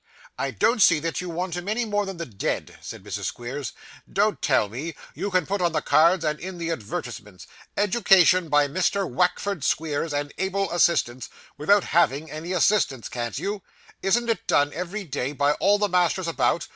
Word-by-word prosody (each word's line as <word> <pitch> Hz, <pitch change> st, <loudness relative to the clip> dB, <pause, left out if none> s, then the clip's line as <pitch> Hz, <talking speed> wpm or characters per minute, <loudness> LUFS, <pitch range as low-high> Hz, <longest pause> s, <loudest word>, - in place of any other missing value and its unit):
'I 135 Hz, 0 st, -1 dB
don't 230 Hz, -, +2 dB
see 165 Hz, -, +6 dB
that 165 Hz, +3 st, -3 dB
you 180 Hz, -, -6 dB
want 175 Hz, +1 st, -3 dB
him 175 Hz, +3 st, -5 dB
any 235 Hz, +3 st, 0 dB
more 205 Hz, -2 st, -1 dB
than 195 Hz, -2 st, -6 dB
the 170 Hz, -, -4 dB
dead,' 105 Hz, -8 st, -3 dB
said -, -, -9 dB
Mrs. -, -, -5 dB
Squeers. 125 Hz, +1 st, -5 dB, 0.4 s
'Don't 210 Hz, +1 st, +1 dB
tell 130 Hz, -8 st, +2 dB
me. 135 Hz, +11 st, -6 dB, 0.2 s
You 200 Hz, -, -3 dB
can 185 Hz, -4 st, +1 dB
put 200 Hz, +2 st, -2 dB
on 170 Hz, -2 st, +1 dB
the 155 Hz, -, 0 dB
cards 165 Hz, +2 st, +4 dB
and 150 Hz, 0 st, -1 dB
in 185 Hz, +1 st, -7 dB
the 170 Hz, -1 st, -3 dB
advertisements, 110 Hz, -, -6 dB, 0.3 s
"Education 185 Hz, -4 st, +4 dB
by 145 Hz, -1 st, +4 dB
Mr. 185 Hz, +5 st, 0 dB
Wackford 180 Hz, -1 st, 0 dB
Squeers 155 Hz, +1 st, -1 dB
and 145 Hz, 0 st, -3 dB
able 195 Hz, 0 st, -1 dB
assistants," 130 Hz, -8 st, +1 dB, 0.3 s
without 195 Hz, +7 st, +3 dB
having 160 Hz, -2 st, +1 dB
any 155 Hz, +4 st, -6 dB
assistants, 180 Hz, -, +1 dB
can't 120 Hz, -1 st, -4 dB
you? 200 Hz, +6 st, -3 dB, 0.4 s
Isn't 235 Hz, +5 st, +1 dB
it 230 Hz, -, -1 dB
done 145 Hz, 0 st, +2 dB
every 180 Hz, +5 st, -4 dB
day 140 Hz, -4 st, -3 dB
by 145 Hz, 0 st, +2 dB
all 205 Hz, +1 st, +4 dB
the 205 Hz, 0 st, +1 dB
masters 180 Hz, -1 st, +1 dB
about? 155 Hz, -1 st, 0 dB
170 Hz, 185 wpm, -24 LUFS, 145-195 Hz, 0.4 s, see